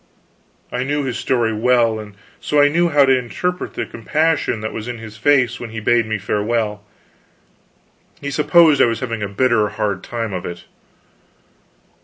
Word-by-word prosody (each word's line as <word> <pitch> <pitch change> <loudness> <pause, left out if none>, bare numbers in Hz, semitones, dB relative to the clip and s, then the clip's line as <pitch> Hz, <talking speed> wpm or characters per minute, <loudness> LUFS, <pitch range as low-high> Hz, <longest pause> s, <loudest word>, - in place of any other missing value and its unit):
I 125 0 -2
knew 145 +2 -1
his 130 -3 -3
story 120 -4 0
well, 115 0 +2
and 105 -2 -10 0.2
so 150 - 0
I 145 0 +6
knew 170 +3 +2
how 145 -3 +5
to 135 0 +4
interpret 180 +9 -3
the - - -2
compassion 155 -1 -1
that 110 - -4
was 110 +1 -6
in 120 -1 -5
his 110 -1 -10
face 125 0 +2
when 120 - -7
he 110 0 -6
bade 115 +1 +2
me 110 -1 -1
farewell. 105 +1 -2 1.4
He 140 - -5
supposed 155 +1 +4
I - - +7
was 115 -1 -2
having 115 -3 -3
a 100 - -1
bitter 110 0 +2
hard 105 -3 -3
time 115 -3 -4
of 90 - -4
it. 85 0 -7
120 Hz, 175 wpm, -19 LUFS, 110-140 Hz, 1.4 s, I